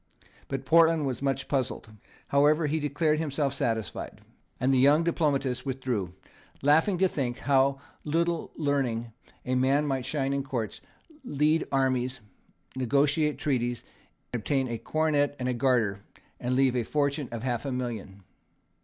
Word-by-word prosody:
But 135 -1 -4
Portland 165 0 +5
was 130 -2 -3
much 135 -1 -1
puzzled. 130 -5 -2 0.4
However, 150 +3 +4
he 155 +2 0
declared 150 +1 +1
himself 145 -3 -1
satisfied; 115 -5 -3 0.4
and 130 +1 +2
the 130 - +4
young 145 +5 +5
diplomatist 140 -6 0
withdrew, 125 -9 -3 0.5
laughing 160 +7 +4
to 190 +2 +4
think 130 -8 -2
with - - -14
how 135 0 +3 0.2
little 170 +2 -1
learning 130 -6 -1 0.3
a 130 - -1
man 135 +3 +2
might 135 -3 -1
shine 140 -2 -1
in 140 - 0
courts, 130 -6 -4 0.4
lead 155 - +1
armies, 130 -1 0 0.6
negotiate 140 +4 +2
treaties, 120 -4 -1 0.5
obtain 130 +3 0
a 115 -1 -3
coronet 150 -1 +1
and 125 - -3
a 125 - +1
garter, 115 -6 +1 0.4
and 125 +1 -1
leave 130 -1 +3
a 125 - +2
fortune 140 +2 -1
of 115 -1 -5
half 120 -3 -1
a 140 - -3
million. 110 -6 -5
135 Hz, 145 wpm, -28 LUFS, 125-150 Hz, 0.6 s, Portland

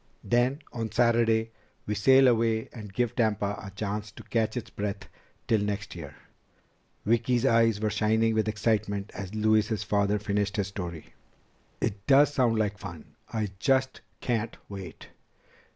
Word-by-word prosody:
Then, 125 +4 +1
on 115 -3 -3
Saturday, 115 -1 +3 0.3
we 105 - -1
sail 130 +6 +6
away 115 -2 +2
and 105 -4 -9
give 120 +3 -1
Tampa 105 -3 0
a 100 - -7
chance 105 +2 -4
to - - -11
catch 110 0 -1
its 115 -1 -6
breath 100 -1 -4 0.3
until 110 -3 +1
next 105 0 -3
year." 75 -5 -8 0.9
Vicki's 120 +2 +2
eyes 115 -4 +4
were 105 0 0
shining 110 +1 +2
with 110 -1 +1
excitement 105 -2 0
as 100 +1 -6
Louise's 110 0 +2
father 100 0 +1
finished 105 0 -1
his 100 -1 0
story. 85 -5 -7 0.7
"It 100 -3 -3
does 145 +1 +6
sound 120 -5 +2
like 105 -2 -1
fun! 85 -3 -9 0.2
I 110 -2 -1
just 130 0 +1 0.2
can't 115 -2 -1
wait!" 95 -5 -9
110 Hz, 150 wpm, -28 LUFS, 100-115 Hz, 0.9 s, sail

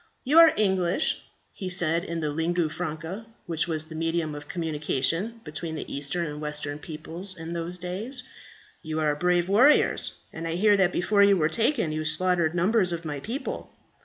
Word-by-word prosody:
"You 295 +5 +5
are 330 -1 +9
English," 190 - +1 0.3
he 190 -3 -5
said, 170 -2 +1
in 170 -3 -4
the 150 -1 -1
lingua 165 +2 0
franca 165 +6 -5 0.2
which 165 -1 0
was 155 -2 0
the 160 - -10
medium 165 -1 -1
of 145 0 -8
communication 165 - -1
between 160 +1 -5
the - - -6
Eastern 145 +5 -1
and 150 -1 -6
Western 150 -1 -3
peoples 165 +5 -6
in 165 +1 -6
those 170 +1 -4
days. 205 +9 -3 0.6
"You 155 -1 -3
are 150 -1 +2
brave 175 +2 +1
warriors, 245 +10 +4 0.2
and 165 +1 -5
I 165 - -2
hear 205 +3 +4
that 190 -3 +3
before 200 +4 +2
you 200 -1 +6
were 155 -2 +2
taken 225 - +1
you 155 0 -2
slaughtered 170 +1 +1
numbers 185 +1 +3
of 170 -1 -4
my 145 -2 -3
people. 240 - -5
170 Hz, 180 wpm, -26 LUFS, 155-190 Hz, 0.6 s, are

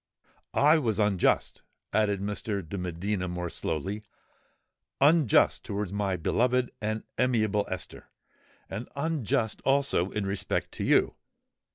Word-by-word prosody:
I 155 +3 +5
was 115 -8 0
unjust," 105 -4 +1 0.3
added 105 -2 +2
Mr. 100 -2 -3
de 100 - -6
Medina, 90 +1 -2
more 90 -1 -4
slowly,—"unjust 105 - 0
towards 100 -1 -3
my 100 -2 0
beloved 125 +8 +1
and 110 +1 -2 0.2
amiable 110 -5 +2
Esther—and 95 +3 -9
unjust 140 -7 -1
also 135 -9 +2
in 105 -1 -3
respect 100 0 -2
to - - -5
you. - - +3
105 Hz, 105 wpm, -28 LUFS, 95-125 Hz, 0.3 s, I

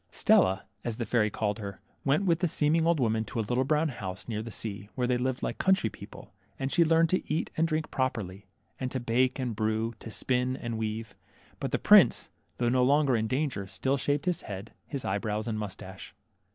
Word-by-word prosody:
Stella, 95 +1 +3 0.2
as 115 -2 -3
the 115 - -2
fairy 110 -3 +2
called 105 0 -2
her, 100 -2 -6 0.2
went 145 +8 +2
with 170 -3 +3
the 180 - +2
seem 150 -1 +1
ing 165 0 +3
old 170 -2 +3
woman 110 -3 +1
to 115 - -4
a 110 - 0
little 125 +2 +1
brown 155 +3 +2
house 95 -7 -6
near, 110 -2 -2
the 115 - -7
sea, 100 -2 -5
where 125 - 0
they 125 0 +2
lived 125 +1 -1
like - - -3
country 190 - +3
people, - - -12 0.2
and 135 0 -2
she 170 - +5
learned 165 0 +3
to 185 - -1
eat 155 - -1
and 165 +1 +2
drink 155 0 -2
properly, 105 -7 -2 0.3
and 130 - -2
to 130 - -3
bake 125 +2 +1
and 125 -4 -2
brew, 110 +2 0
to - - -8
spin 125 +3 0
and 115 -1 -4
weave. 110 -1 -3 0.5
But - - -2
the - - +1
prince, - - +6 0.3
tlj 120 - 0
ough 120 - +3
no 125 0 +3
longer 140 0 +4
in 110 -1 0
danger, 130 -6 -1
still 135 +7 0
shaved 145 +2 0
his 180 -3 0
head, 100 +1 -7
his 140 -4 -4
eyebrows, 105 +3 -1
and 110 -2 -2
moustache. 95 -2 -7
120 Hz, 220 wpm, -29 LUFS, 110-140 Hz, 0.5 s, prince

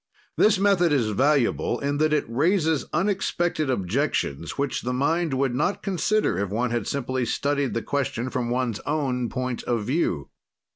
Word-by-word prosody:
This 215 -1 +4
method 190 -4 +3
is 120 -7 +2
valuable 130 0 +2
in 140 +1 -1
that 155 0 +3
it 150 - +2
raises 155 - +1
unexpected 175 -6 0
objections, 100 - -1
which 140 -1 -1
the 125 +1 -2
mind 155 +3 +1
would 130 -1 +1
not 180 +10 -1
consider 195 - +1
if 100 -1 -1
one 115 +4 -1
had 120 -3 -1
simply 130 -2 -1
studied 140 +2 -1
the 115 - -1
question 130 -3 -2
from 125 -4 -2
one's 120 -3 -1
own 130 -5 -1
point 130 -1 -3
of 115 -3 0
view. 130 - -1
135 Hz, 160 wpm, -25 LUFS, 120-155 Hz, -, This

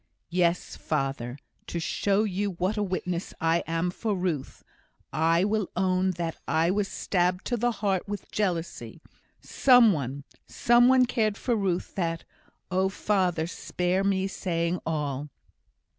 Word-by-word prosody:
Yes, 175 0 +1
father, 135 -4 -2 0.3
to 170 - -3
show 200 +5 +1
you 200 -1 -1
what 185 +4 -1
a 210 - -1
witness 180 -2 -3
I 165 0 +2
am 165 +2 0
for 210 +2 -2
Ruth, 175 -7 -3 0.5
I 165 +2 +3
will 210 -1 0
own 185 0 +2
that 165 -2 -3
I 165 +2 +2
was 200 0 0
stabbed 180 -1 0
to 245 - 0
the 240 +1 +1
heart 205 -4 -1
with 205 -1 -6
jealousy; 175 -5 -2 0.4
some 245 -5 +5
one 140 -2 -4 0.2
some 240 +1 +4
one 260 0 +6
cared 220 -4 0
for 240 - 0
Ruth 190 -4 -1
that 165 -3 -2 0.5
oh, 190 +1 +2
father! 185 -5 0
spare 180 +2 -1
me 195 -1 +1
saying 170 -2 -1
all." 145 -2 -2
185 Hz, 145 wpm, -27 LUFS, 165-205 Hz, 0.5 s, one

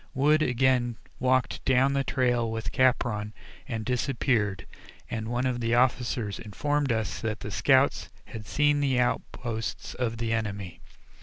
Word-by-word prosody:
Wood 150 +4 +4
again 125 -3 +2 0.2
walked 130 0 +1
down 135 +1 +3
the 140 0 +1
trail 125 -3 +1
with 115 0 -4
Capron 120 -5 +1 0.3
and 110 -2 -4
disappeared, 120 -6 0 0.5
and 110 -1 -3
one 120 +2 -1
of 125 -1 0
the 115 0 +1
officers 120 -4 +1
informed 145 +6 -1
us 110 -4 -2
that 110 -1 -3
the 105 - -5
scouts 135 +5 +3 0.2
had 110 -3 -9
seen 145 0 +2
the 135 -3 +1
outposts 115 -2 -2
of 115 -2 -2
the 115 0 -1
enemy. 100 -5 -3
120 Hz, 145 wpm, -27 LUFS, 110-130 Hz, 0.5 s, Wood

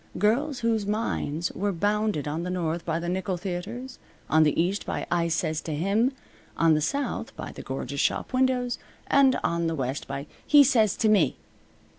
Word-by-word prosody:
Girls 245 +8 +1
whose 225 -3 +1
minds 175 -7 -1
were 205 +1 -1
bounded 205 -4 0
on 155 +3 -2
the 180 - -3
north 170 -2 -2
by 165 -1 0
the 170 +1 -4
nickel 185 +1 -1
theatres; 205 +8 -5 0.3
on 155 - +5
the 150 -1 +3
east 185 +5 +1
by - - -3
"I 170 -1 +2
sez 160 -1 -1
to 155 - -2
him"; 200 - +2 0.5
on 165 -1 +4
the 155 - +2
south 275 - -2
by - - -6
the - - -9
gorgeous 135 +1 -5
shop - - -1
windows; 255 -1 +1 0.3
and 270 -2 +4
on 170 0 0
the 165 - -1
west 135 0 -3
by 140 +1 -4 0.2
"He 290 -1 +8
sez 225 -7 +3
t' 220 - +2
me." 210 -6 +3
185 Hz, 185 wpm, -26 LUFS, 160-230 Hz, 0.5 s, He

